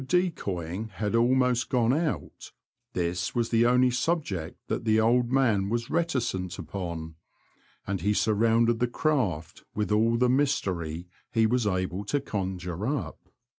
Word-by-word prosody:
decoying 105 - -1
had 105 -1 -2
almost 125 +1 +2
gone 120 -1 +2
out, 140 - -3 0.4
this 90 +4 -2
was 120 -1 0
the 115 0 +4
only 125 +1 +4
subject 125 - -2
that - - -3
the 110 -1 +3
old 120 +2 +3
man 110 -8 +2
was 120 +1 -2
reticent 120 - -1
upon, 85 -2 -5 0.7
and 100 -3 -2
he 105 - +1
surrounded 115 +2 +2
the 125 - +2
craft 105 - -1
with 105 0 -1
all 115 +2 +3
the 125 +1 +3
mystery 90 - 0 0.2
he 115 -1 +3
was 120 0 +1
able 95 0 -1
to 145 +8 0
conjure 95 -5 -4
up. 125 - -4
110 Hz, 140 wpm, -27 LUFS, 95-125 Hz, 0.7 s, the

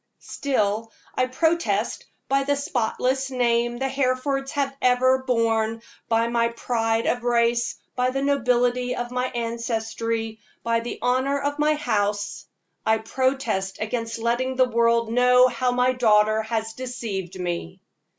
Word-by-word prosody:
Still, 225 -5 -1 0.2
I 255 - +1
protest, 325 +6 0 0.2
by 275 0 +2
the 285 +1 +1
spotless 265 0 -1
name 240 -2 +1
the 265 +2 -1
Herefords 270 +1 -1
have 275 -2 -1
ever 255 +1 +4
borne, 225 -3 0 0.3
by 230 0 +2
my 235 0 +2
pride 230 -1 -1
of 245 0 0
race, 235 0 +1 0.2
by 250 0 +1
the 270 +1 -2
nobility 250 -2 +1
of 240 0 -4
my 250 0 -1
ancestry, 230 -1 -3 0.2
by 230 0 +1
the 235 +1 -5
honor 260 +3 +1
of 285 +1 -2
my 305 +1 +3
house 205 -7 -1 0.4
I 220 0 +3
protest 225 -5 -1
against 230 +1 -3
letting 240 +3 -1
the 255 0 +4
world 235 -1 +2
know 250 +1 +5
how 250 0 0
my 250 +1 +2
daughter 215 -3 +3
has 220 0 -3
deceived 220 -8 -5
me. 175 +1 -4
240 Hz, 140 wpm, -24 LUFS, 225-255 Hz, 0.4 s, know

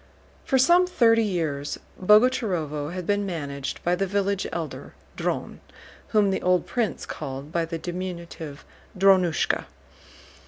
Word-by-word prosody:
For 265 - +2
some 345 +8 +5
thirty 230 -9 +4
years 160 -9 -2 0.2
Boguchárovo 185 - +3
had 180 -1 -5
been 205 +1 +1
managed 140 -7 -4
by 175 - +2
the 195 +2 0
village 200 0 0
Elder, 165 -2 -6 0.2
Dron, - - -3 0.5
whom 210 -3 +3
the 190 - -1
old 180 0 +2
prince 230 -8 -2
called 140 0 -6
by 170 -1 0
the 165 0 -4
diminutive 170 -4 -6 0.3
"Drónushka." 185 -5 +3
180 Hz, 125 wpm, -25 LUFS, 160-205 Hz, 0.5 s, some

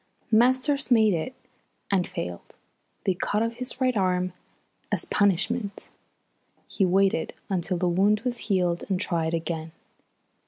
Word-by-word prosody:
Masters 260 +5 +3
made 220 -4 +5
it 175 +10 -3 0.6
and 185 -3 +2
failed. 90 0 -6 0.5
They 190 - +2
cut 210 +4 0
off 230 0 -1
his 250 +1 -5
right 255 -2 +2
arm 185 -2 +1 0.6
as - - +1
a - - -11
punishment. 205 +2 0 0.8
He 195 - +1
waited 190 -2 +2 0.2
until 180 -1 0
the 180 +1 0
wound 200 +4 +3
was 240 -1 -2
healed 180 -3 +1
and 190 -2 +1
tried 165 -2 0
again. 160 -1 -4
195 Hz, 135 wpm, -26 LUFS, 175-230 Hz, 0.8 s, made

